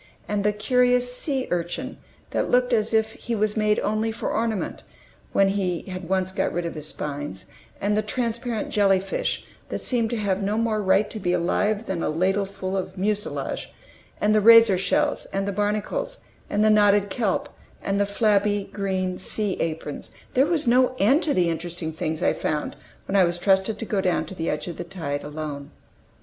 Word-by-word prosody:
And 205 -1 -1
the 210 - +3
curious 250 +3 +2
sea 265 -1 -1
urchin, 175 +10 -3 0.3
that - - 0
looked 250 0 +3
as 220 -1 +2
if 220 0 +2
he 235 - -4
was 210 0 +1
made 215 -1 +2
only 215 +1 0
for 225 - -3
ornament, 220 -3 -2 0.5
when 195 0 +4
he 185 -3 -1
had 185 -2 -7
once 190 -1 +1
got 190 - -1
rid 175 0 -2
of 170 - -3
his 155 -1 -5
spines, 145 -11 -5 0.3
and 205 +1 +1
the 215 - +2
transparent 235 0 -2
jelly 195 -2 +4
fish, 190 0 -2 0.2
that - - -2
seemed 235 -3 +1
to 235 - -2
have 200 -2 0
no 205 +2 0
more 225 -2 +1
right 200 +2 +3
to 220 - -5
be 180 -2 0
alive 205 +5 +1
than 185 -3 -3
a - - 0
ladleful 190 +3 -1
of 185 0 -4
mucilage, 210 +3 -2 0.5
and 210 +1 +3
the 215 - +4
razor 230 -2 +8
shells, 185 -1 +1
and 195 0 -2
the - - 0
barnacles, 210 - -2 0.2
and 205 +1 +1
the 215 - +5
knotted 205 -1 +4
kelp, 220 -6 -1 0.3
and 200 0 -1
the 200 - +2
flabby 205 -1 +2
green 190 -2 -2
sea 205 +1 -1
aprons, 155 -3 -4 0.2
there 265 +3 +4
was 315 -5 0
no 255 +1 +4
end 265 - +4
to 315 -3 +1
the 180 -2 +3
interesting 165 -1 -3
things 160 0 -3
I - - +3
found 150 -1 -2 0.3
when 195 - -2
I 195 - +6
was 175 0 +1
trusted 190 +3 +2
to 225 - -5
go 205 -3 0
down 180 -2 +1
to - - -9
the 165 -3 -3
edge 150 - -2
of 175 -3 -6
the - - -4
tide 150 -5 -4
alone. 150 -1 -6
200 Hz, 195 wpm, -24 LUFS, 180-220 Hz, 0.5 s, razor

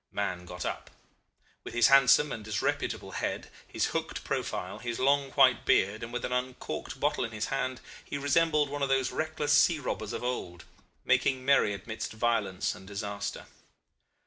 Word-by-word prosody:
Mahon 90 -3 -3
got 90 +1 -6
up. - - -4 0.7
With - - -8
his 120 0 +5
handsome 140 +2 +6
and 115 -3 -5
disreputable 105 -1 -2
head, - - -3 0.2
his - - 0
hooked - - -3
profile, - - -3
his 120 -1 -4
long 140 +1 +2
white 130 -4 +5
beard, 100 +3 +2
and 115 0 -6
with 125 - -3
an - - -4
uncorked 125 0 -4
bottle 145 +2 +1
in 115 - -4
his 110 0 -2
hand, 130 -2 -2 0.2
he - - -5
resembled 150 +1 +2
one 145 0 -4
of 140 - +1
those 135 -1 +2
reckless 155 -2 -1
sea 155 +3 +5
robbers 110 -6 -4
of - - -4
old 90 -8 -4 0.4
making 130 -1 +2
merry 140 -6 +4
amidst 110 +3 -5
violence 110 -5 0
and 95 - -13
disaster. 100 0 -5
125 Hz, 170 wpm, -29 LUFS, 105-140 Hz, 0.7 s, handsome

